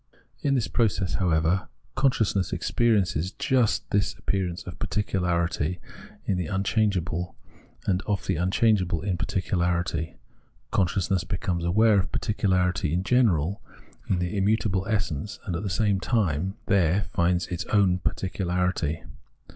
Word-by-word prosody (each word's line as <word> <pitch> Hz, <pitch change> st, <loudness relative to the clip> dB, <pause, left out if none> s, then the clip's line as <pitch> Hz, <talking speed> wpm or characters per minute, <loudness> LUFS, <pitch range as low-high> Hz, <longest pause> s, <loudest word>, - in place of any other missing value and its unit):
In 140 Hz, -1 st, +2 dB
this 120 Hz, -5 st, +1 dB
process, 105 Hz, -6 st, 0 dB
however, 85 Hz, 0 st, +1 dB, 0.3 s
consciousness 110 Hz, -, +1 dB
experiences 100 Hz, -7 st, +1 dB
just 125 Hz, -4 st, +1 dB
this 100 Hz, -1 st, +1 dB
appearance 90 Hz, -3 st, -2 dB
of 90 Hz, -4 st, -9 dB
particularity 90 Hz, -4 st, -1 dB, 0.5 s
in 95 Hz, -2 st, 0 dB
the 90 Hz, -, -2 dB
unchange 100 Hz, +1 st, +1 dB
able, 90 Hz, +1 st, -3 dB, 0.5 s
and 95 Hz, -1 st, +1 dB
of 105 Hz, -2 st, -1 dB
the -, -, 0 dB
unchangeable 95 Hz, 0 st, +2 dB
in 95 Hz, -2 st, 0 dB
particularity. 85 Hz, -3 st, -1 dB, 0.6 s
Con 95 Hz, -, +3 dB
sciousness 95 Hz, 0 st, 0 dB
becomes 90 Hz, -2 st, -2 dB
aware 105 Hz, +4 st, +4 dB
of 90 Hz, -, -2 dB
particularity 90 Hz, -7 st, 0 dB
in 90 Hz, -, 0 dB
general 100 Hz, -, +2 dB, 0.5 s
in 95 Hz, -, +2 dB
the 90 Hz, +3 st, -2 dB
immutable 100 Hz, -1 st, +1 dB
essence, 100 Hz, -4 st, -2 dB
and 90 Hz, -5 st, -2 dB
at 85 Hz, -, -2 dB
the 100 Hz, -, -3 dB
same 100 Hz, 0 st, +1 dB
time 95 Hz, -, 0 dB
it -, -, -19 dB
there 95 Hz, 0 st, +3 dB
finds 90 Hz, 0 st, +2 dB
its 90 Hz, -, -3 dB
own 95 Hz, -4 st, +3 dB
particularity. 90 Hz, -4 st, -1 dB
95 Hz, 135 wpm, -26 LUFS, 85-100 Hz, 0.6 s, aware